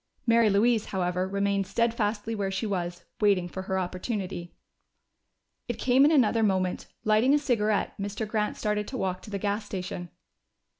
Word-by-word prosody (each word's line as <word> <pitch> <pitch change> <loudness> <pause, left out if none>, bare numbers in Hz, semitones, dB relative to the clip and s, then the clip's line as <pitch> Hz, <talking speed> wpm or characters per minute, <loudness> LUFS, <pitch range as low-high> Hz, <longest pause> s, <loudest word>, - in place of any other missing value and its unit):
Mary 230 -2 +5
Louise, 215 +2 +3
however, 180 -1 -1
remained 200 0 0
steadfastly 225 0 0
where 200 -3 -1
she 190 +3 -2
was, 175 -4 -3
waiting 200 -4 +3
for 190 +2 -6
her 190 0 -2
opportunity. 185 -1 -3 1.2
It 240 - -3
came 260 +3 +4
in 300 - +5
another 235 -6 +4
moment. 185 -3 0 0.2
Lighting 220 +6 +4
a - - +5
cigarette, 215 -7 +1
Mr. 205 +2 -3
Grant 210 -1 -1
started 210 0 -1
to 260 - -5
walk 185 -4 -2
to - - -11
the 200 - -3
gas 205 +2 -1
station. 180 -3 -5
205 Hz, 160 wpm, -27 LUFS, 190-225 Hz, 1.2 s, Mary